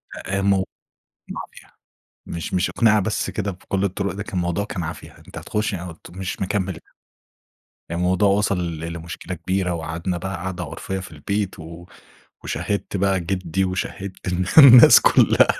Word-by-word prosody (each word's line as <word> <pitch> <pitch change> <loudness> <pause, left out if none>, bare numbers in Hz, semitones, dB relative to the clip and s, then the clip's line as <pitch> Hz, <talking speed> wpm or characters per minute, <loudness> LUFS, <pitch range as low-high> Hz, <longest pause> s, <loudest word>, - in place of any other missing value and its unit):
أ 95 +1 -4
آآ - - 0
مو 100 -1 +2 0.6
مافيا. - - -9 0.6
مش 85 +2 -5
مش 90 +1 +1
أقنِعة 110 -2 +3
بس 105 +2 -2
كده 100 -1 -3
بكل 95 +1 -3
الطُرُق، 100 0 -2
ده 100 - -4
كان 95 -3 -5
موضوع 85 +3 -1
كان 90 -4 -5
عافية. 80 - -7
أنت - - -8
هتخُش 105 0 -2
يعني 90 -1 -5
قُلت 80 - -15
مش 95 +1 -5
مكمّل. 95 -2 -2 1.1
يعني 85 +1 -3
الموضوع 95 +3 +3
وصَل 90 -5 0
لمشكلة 85 +2 -6
كبيرة 90 +1 -1
وقعدنا 85 +2 -3
بقى 95 +1 -4
قعدة 90 0 -5
عُرفية 85 +5 -5
في 90 -2 -9
البيت 100 +5 -3
و 85 +2 -10 0.6
وشَهِّدت 100 0 -3
بقى 95 0 +1
جِدّي 90 +1 -1
وشَهِّدت 95 +1 -5
الن 90 +1 0
الناس 125 -4 +10
كُلّها. - - +5
95 Hz, 160 wpm, -22 LUFS, 85-100 Hz, 1.1 s, الناس